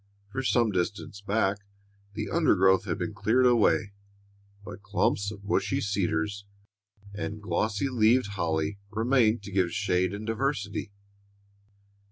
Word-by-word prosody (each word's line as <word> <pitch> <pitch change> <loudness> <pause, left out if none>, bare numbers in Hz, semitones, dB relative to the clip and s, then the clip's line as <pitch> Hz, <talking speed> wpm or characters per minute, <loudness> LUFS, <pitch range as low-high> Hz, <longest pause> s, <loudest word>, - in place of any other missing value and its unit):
For 135 - -2
some 120 -3 +2
distance 100 +2 -3
back 100 -1 0 0.6
the 105 0 -3
undergrowth 95 - +3
had - - -2
been - - -3
cleared 125 +4 +2
away, 115 -4 +3 0.7
but 95 +1 -9
clumps 100 0 0
of 100 -1 -10
bushy 125 +6 0
cedars 100 -3 -1 0.7
and 105 +1 -5
glossy 110 +3 -1
leaved 120 -2 +3
holly 85 0 -2
remained 115 0 +2
to 100 - -8
give 90 -3 +1
shade 95 -2 0
and 100 +2 -6
diversity. 105 -4 -2
105 Hz, 125 wpm, -27 LUFS, 100-115 Hz, 0.7 s, undergrowth